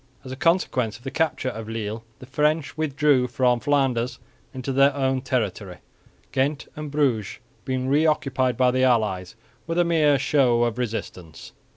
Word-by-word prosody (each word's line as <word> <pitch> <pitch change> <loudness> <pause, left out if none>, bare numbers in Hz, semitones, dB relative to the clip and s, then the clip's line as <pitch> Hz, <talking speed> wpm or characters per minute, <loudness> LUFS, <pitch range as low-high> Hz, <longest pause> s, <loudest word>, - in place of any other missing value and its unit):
As 130 - -9
a - - -4
consequence 130 - +1
of 120 - -22
the 135 - -5
capture 160 -5 -1
of 110 -2 -7
Lille, 110 0 -4
the - - -12
French 150 +3 0
withdrew 145 -4 +2
from 125 0 +1
Flanders 130 -3 0 0.3
into 130 +1 -5
their 135 +1 +4
own 135 -1 0
territory, 105 -8 -3 0.5
Ghent 140 +2 -1
and 150 -1 -6
Bruges 135 -8 0 0.3
being 130 0 -2
re 150 +4 +3
occupied 130 -5 0
by 125 -1 +4
the 130 +1 0
allies 105 -7 +1 0.3
with 165 0 -2
a 175 - +3
mere 155 -4 +3
show 130 -3 +2
of 120 0 -1
resistance. 105 -8 -6
130 Hz, 165 wpm, -24 LUFS, 120-145 Hz, 0.5 s, their